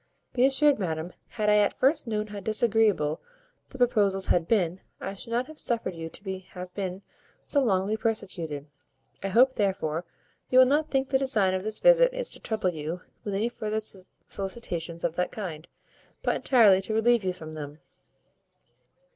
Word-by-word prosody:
Be 255 +1 +4
assured, 280 0 +4
madam, 165 -2 -3
had 215 -3 -3
I 210 0 +5
at 205 -1 +2
first 275 0 +2
known 210 -1 -1
how 205 -1 -7
disagreeable 215 -7 +1 0.5
the 265 - -11
proposals 205 -6 +2
had 170 -2 +1
been, 185 -5 +1 0.2
I 195 - -5
should 200 - -8
not 240 +2 0
have 310 +1 -11
suffered 230 -6 -1
you 165 -1 -6
to 190 +1 -5
have 180 0 -8
been 190 -1 -4 0.4
so 285 - +2
long 200 -2 +1
persecuted. 185 -10 -2 0.6
I 195 - -2
hope, 245 +7 +4
therefore, 180 -6 -1 0.4
you 255 - +3
will 255 - +9
not 295 +4 +1
think 270 -1 0
the 265 - +2
design 220 -9 +3
of 185 - -1
this 215 +2 -1
visit - - +5
is - - -2
to - - -7
trouble 215 -5 -1
you 160 +2 -5 0.2
with 205 -2 -3
any 215 +4 +1
further 220 -2 -3 0.5
solicitations 175 -5 -5
of 170 -1 -1
that 180 - 0
kind, 170 -7 -6 0.6
but - - +1
entirely 215 -7 +5
to 215 +3 -3
relieve 235 0 +3
you 185 - 0
from 160 -3 -9
them." 150 -1 -7
205 Hz, 175 wpm, -27 LUFS, 180-240 Hz, 0.6 s, will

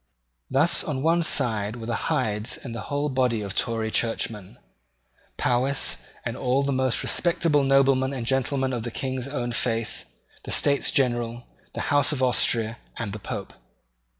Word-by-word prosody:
Thus 145 +6 +4
on 140 -3 -3
one 165 +2 +3
side 115 -9 +2
were 115 -2 -7
the 115 +3 -3
Hydes 115 -7 0
and 120 - -8
the 115 - -5
whole 145 0 0
body 125 -5 +1
of 100 -1 -5
Tory 110 -1 -1
churchmen, 110 - -2 0.8
Powis 130 +3 +2 0.3
and - - -3
all 130 +2 +1
the 140 - 0
most 130 -2 +1
respectable 165 -4 +2
noblemen 135 -1 +3
and 130 -4 -4
gentlemen 135 +1 0
of 120 - -2
the 120 - -4
King's 130 +1 -4
own 125 -4 -3
faith, 115 -1 -2 0.4
the - - -10
States 140 -1 +2
General, 120 -2 0 0.3
the - - -2
House 145 0 +4
of 135 -3 -1
Austria, 115 -2 +1 0.2
and 105 -4 -4
the 110 - -5
Pope. - - -6
130 Hz, 160 wpm, -25 LUFS, 115-140 Hz, 0.8 s, Thus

